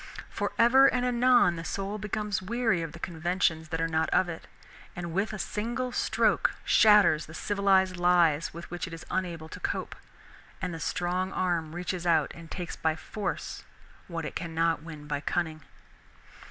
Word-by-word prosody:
For - - -2
ever 260 +4 +7
and 250 0 +1
anon 245 -7 +4
the 165 - -5
soul 200 +4 -4
becomes 210 -1 -2
weary 225 -2 0
of 165 -2 -5
the 170 - -10
conventions 165 -1 -1
that 160 0 -2
are 165 - +1
not 160 0 0
of 185 - +3
it, 165 - -7 0.5
and 170 -1 -5
with 195 +5 0
a 215 - -5
single 240 +5 -3
stroke - - +1
shatters 210 -8 +5
the 160 - -10
civilized 190 -2 +2
lies 175 -3 +3
with 170 +1 -10
which 175 0 -4
it 165 - -9
is 165 - -8
unable 170 -4 -2
to - - -9
cope, - - -3 0.6
and 180 -2 -3
the 165 - -6
strong 180 +4 -1
arm 170 -3 -1
reaches 175 0 -3
out 160 -4 +3
and 165 -1 -12
takes 175 0 -5
by 160 -1 0
force 205 +6 -5 0.4
what 165 -2 -4
it - - -5
cannot 165 -1 0
win 155 -2 -9
by 145 -1 -3
cunning. 160 -1 -2
175 Hz, 175 wpm, -28 LUFS, 165-200 Hz, 0.6 s, ever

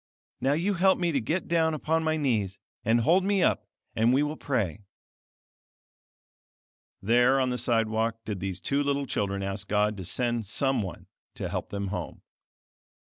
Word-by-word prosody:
Now 135 +2 +2
you 175 +7 +1
help 190 +1 +4
me 175 -1 0
to 140 -4 0
get 165 +11 -2
down 160 -2 +2
upon 160 +2 0
my 160 0 +1
knees, 110 -10 0 0.3
and 115 +2 +3
hold 175 +10 +4
me 195 -1 +2
up, - - +1 0.3
and 115 +2 +3
we 135 +3 +3
will 150 +1 -2
pray." 110 - -2 2.2
There 120 +5 +4
on 130 -1 +1
the 125 - -1
side 115 -2 +2
walk 115 +1 -2
did 105 -3 -4
these 95 0 -3
two 140 +1 0
little 140 0 0
children 100 -5 -2
ask 100 +1 -4
God 105 +1 +1
to 95 - -5
send 120 +2 0
some 135 +4 +1
one 90 -6 -7 0.3
to - - -4
help - - -4
them 100 -1 -3
home. 90 -3 -5
120 Hz, 175 wpm, -27 LUFS, 105-150 Hz, 2.2 s, help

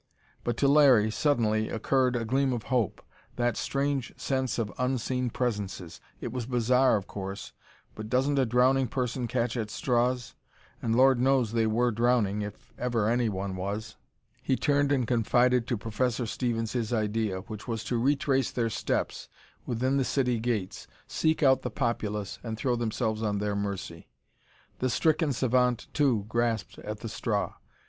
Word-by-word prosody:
But 120 -1 -2
to 140 - +3
Larry, 135 -7 +6
suddenly, 110 -5 +1
occurred 125 +3 +1
a 115 -1 -1
gleam 135 +3 +1
of 115 -3 -3
hope. 120 -7 0 0.3
That 120 -2 0
strange 140 -2 -1
sense 130 -1 -1
of 115 -3 -2
unseen 125 0 0
presences! 100 -8 -3 0.2
It 120 - -5
was 120 -1 -4
bizarre, 125 +1 +3
of 100 - -5
course, 100 0 -7 0.4
but 110 0 -7
doesn't 135 +4 +2
a 130 - +2
drowning 130 +3 +3
person 125 0 -2
catch 120 0 -1
at 110 -3 -2
straws? 125 +2 0 0.5
And 115 -1 0
Lord 130 0 +5
knows 130 -3 +2
they 115 -1 +2
were 120 +3 +2
drowning, 115 -3 +1
if 105 -1 -8
ever 120 -4 0
anyone 105 -5 0
was! 105 +4 -4 0.5
He 130 - +1
turned 145 0 +2
and 130 -4 +2
confided 120 +1 +2
to 120 - 0
Professor 120 +3 -1
Stevens 115 -1 -2
his 120 -3 -2
idea, 110 -3 0
which 105 +3 -9
was 115 -2 -3
to 115 +1 -1
retrace 135 0 +2
their 115 -2 -1
steps - - -2 0.4
within 130 +3 0
the 135 - +2
city 125 -3 0
gates, 110 -5 -3 0.2
seek 160 0 0
out 130 -1 +5
the - - -3
populace 105 -5 -2
and 110 -1 -5
throw 125 +1 0
themselves 110 -1 -1
on 105 -2 0
their 105 0 -1
mercy. 100 -4 -4 0.7
The 130 - 0
stricken 155 +3 +2
savant, 125 -1 +1
too, 125 -9 +2
grasped 115 -2 -1
at - - -6
the - - -5
straw. - - -2
120 Hz, 160 wpm, -28 LUFS, 110-130 Hz, 0.7 s, Larry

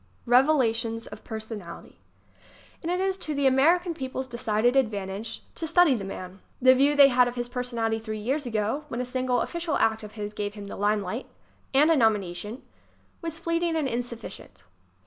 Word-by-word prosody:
Revelations 235 -3 +3
of - - -11
Personality 220 -5 -8 0.8
And 335 - -2
it 360 - 0
is 380 0 0
to 310 -5 -4
the 280 0 0
American 335 +7 +4
people's 260 -3 -4
decided 235 -1 0
ad 265 -5 +4
vantage 205 +2 -5
to 325 - -4
study 335 -2 +5
the 220 -6 -2
man. 190 0 -7 0.2
The 255 0 +7
view 280 +3 +3
they 280 -1 +8
had 250 -1 +4
of 245 - -4
his 240 -1 -3
personality 235 -3 -2
three 220 -1 -5
years 260 +6 -2
ago, 225 +6 -1
when 240 -4 -4
a 250 - -1
single 250 0 0
of - - -3
ficial 340 -3 -1
act 220 0 +2
of 210 -1 -10
his 210 -1 -5
gave 205 0 -4
him 205 -1 -8
the 200 - -7
limelight 205 +3 -1 0.5
ŌĆö 275 - +7
and 320 - +4
a - - +5
nom 225 -5 +4
ination 185 +1 -6
ŌĆö 255 - -11 0.6
was 330 -1 -5
fleeting 335 0 0
and 310 -4 0
insufficient. 240 -1 -6
245 Hz, 195 wpm, -26 LUFS, 220-285 Hz, 0.8 s, they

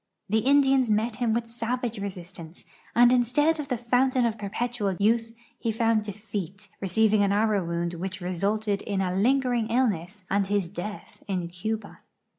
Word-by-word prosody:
The 220 +2 +3
Indians 270 0 +4
met 215 +1 +1
him 240 -2 +1
with 230 +1 0
savage 235 0 -3
resistance, 180 -4 -8 0.3
and 240 +1 +7
instead 290 +6 +2
of 295 - -4
the 250 -3 -1
fountain 250 +1 +2
of 225 -2 0
per; 205 -2 -6
])etual 210 -4 -2
youth 225 +2 +1 0.2
he 230 - -1
found 225 -1 +1
defeat, 205 -1 -6
receiving 215 +2 +3
an 200 -1 +3
arrow 210 -1 +2
wound 170 0 -2
which 185 +2 -5
resulted 200 +3 -1
in 200 -2 -2
a 185 -1 0
lingering 245 +1 +2
illness 210 -6 0
and 200 0 +1
his 200 -3 0
death 200 +3 -7
in 180 -4 -2
Cuba. 210 +4 -5
215 Hz, 165 wpm, -26 LUFS, 195-235 Hz, 0.3 s, and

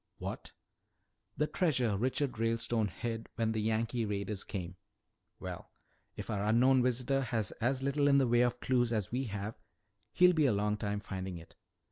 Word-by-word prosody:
"What?" - - -6 0.9
"The 150 - +2
treasure 130 - +1
Richard 125 +3 -1
Ralestone 115 -1 +1
hid 115 +2 -5
when 115 -1 0
the 110 -1 -1
Yankee 115 +2 0
raiders 100 -1 -2
came." 95 -2 -6 0.6
"Well, - - -7 0.5
if - - -6
our 100 -2 -1
unknown 125 +5 +4
visitor 125 +2 +1
has 115 -5 -1
as 130 +3 +1
little 140 +1 +2
in 140 -1 +5
the 135 -2 +4
way 120 0 +4
of 120 0 +1
clues 120 -2 +2
as 105 -5 -1
we 130 +3 -1
have, 100 0 -5 0.5
he'll 180 0 +6
be 155 -4 +3
a 125 - +3
long 105 +1 +1
time 105 -1 -2
finding 95 -2 -5
it." 80 - -13
115 Hz, 170 wpm, -32 LUFS, 105-130 Hz, 0.9 s, he'll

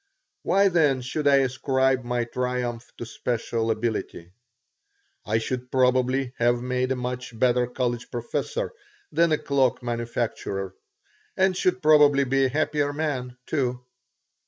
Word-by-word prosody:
Why, 200 +1 +3
then, 150 -8 +2
should 145 +4 -2
I 140 - +6
ascribe 130 0 +1
my 120 0 -1
triumph 125 -1 -3
to 120 - -6
special 115 -1 -2
ability? 110 -6 -3 1.0
I - - +2
should 125 +2 -3
probably 130 0 +2
have 120 0 +3
made 125 +1 -1
a - - +2
much 125 -1 -5
better 125 0 +2
college 120 -1 -3
professor 145 - -3 0.4
than 170 -1 +3
a 155 - +3
cloak 135 -4 +1
manufacturer, 115 -5 -3 0.6
and 190 0 +3
should 185 0 0
probably 145 -2 +6
be 135 +1 +2
a - - +1
happier 145 +1 0
man, 135 -5 -3
too. 125 -4 -2
125 Hz, 135 wpm, -25 LUFS, 120-140 Hz, 1.0 s, I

